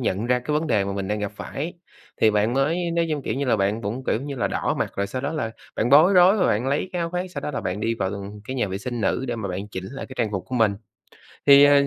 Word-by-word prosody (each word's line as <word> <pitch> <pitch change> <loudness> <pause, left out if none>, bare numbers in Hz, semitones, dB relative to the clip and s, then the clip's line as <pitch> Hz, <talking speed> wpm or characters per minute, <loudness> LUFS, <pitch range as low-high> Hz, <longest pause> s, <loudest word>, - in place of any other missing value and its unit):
nhận 110 -2 -1
ra 125 0 +3
cái 125 +5 -3
vấn 160 - -3
đề 105 -9 +2
mà 100 - -3
mình 100 -1 -3
đang 105 0 -1
gặp 105 -1 -3
phải, 155 +10 -5 0.5
thì 110 - +6
bạn 105 +2 +1
mới, 165 +6 +1
nói 170 0 +1
chung, 150 -2 -1
kiểu - - -2
như 140 - -1
là, 120 -4 +2
bạn 100 +3 0
cũng, 115 +6 -4
kiểu 115 - 0
như 140 +1 -5
là, 120 - 0
đỏ - - -1
mặt, - - -1
rồi 100 0 0
sau 130 - -4
đó 140 +3 -2
là 150 -8 -2 0.3
bạn 115 - +1
bối 160 +7 +7
rối 185 +3 +7
và 185 - +3
bạn 110 +5 +1
lấy 145 +6 0
cái 180 - -2
áo 170 0 -2
khoác, 180 +1 -3
sau - - -5
đó - - -3
là 145 - -3
bạn 90 +3 -3
đi 115 +1 0
vào 95 -4 -1 0.3
cái 130 +3 -5
nhà 105 - 0
vệ 95 +1 -3
sinh 120 +2 -4
nữ 115 +5 0
để 120 - -2
mà 110 -3 -4
bạn 95 +3 -4
chỉnh 95 -2 -6
lại 135 - -6
cái 130 - -10
trang 110 -3 +1
phục 95 -4 -3
của 130 - -5
mình. 110 -4 +3 0.7
Thì, 140 0 +9
ờ, 145 -1 +5
125 Hz, 310 wpm, -24 LUFS, 105-145 Hz, 0.7 s, Thì